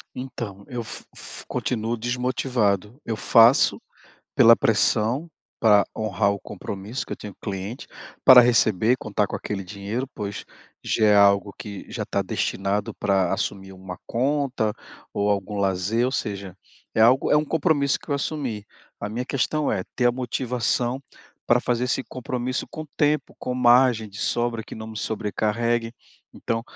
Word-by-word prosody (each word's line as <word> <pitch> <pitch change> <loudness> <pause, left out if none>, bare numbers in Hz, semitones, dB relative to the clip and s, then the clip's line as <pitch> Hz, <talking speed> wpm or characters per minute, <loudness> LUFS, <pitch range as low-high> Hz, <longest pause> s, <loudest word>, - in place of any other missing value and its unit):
Então, 115 -6 -7
eu 120 -2 -4
fi 110 - -8
fi - - -10
continuo 115 0 -2
desmotivado, 120 -2 -1
eu 115 - -2
faço 115 +4 +5 0.5
pela 115 0 +7
pressão, 115 - +1 0.3
pra 105 -3 +5
honrar 105 -2 +1
o 100 - -4
compromisso 105 +5 -6
que - - -6
eu - - -4
tenho 105 -2 -9
cliente. 100 +4 -5 0.4
Para 130 -1 +10
receber, 115 -1 +3
contar 105 -1 -1
com - - -7
aquele 100 -2 -5
dinheiro, 100 +7 -4
pois 100 -2 -5 0.4
já 110 - +2
é 105 - +5
algo 100 0 +4
que 100 -2 -8
já - - -3
tá - - -1
destinado 100 +3 -2
pra 95 -2 +1
assumir 95 0 -3
uma 95 -1 -9
conta, 130 -3 0 0.4
ou 100 0 +1
algum 100 +1 -2
lazer 100 +4 +1
ou 130 - -2
seja, 100 -6 -4 0.4
é - - +1
algo 125 +4 +5
é - - +5
um 150 - +2
compromisso 145 -2 +1
que - - -13
eu - - +2
assumi. 135 -7 -3 0.4
A 100 - -3
minha 115 +4 -3
questão 145 +3 0
é 95 - -1
ter 125 - +2
a 120 - +4
motivação 125 0 -1 0.5
pra 120 0 +4
fazer 125 0 0
esse 125 +1 0
compromisso 125 0 -4
com 155 - -7
tempo, 150 -1 +1
com 125 - -3
margem 120 -2 +4
de 100 +1 -11
sobra 120 0 -1
que - - -9
não 110 0 -8
me 110 - -9
sobrecarregue, 115 +2 -1 0.5
então, 115 0 -2
115 Hz, 160 wpm, -24 LUFS, 100-125 Hz, 0.5 s, Para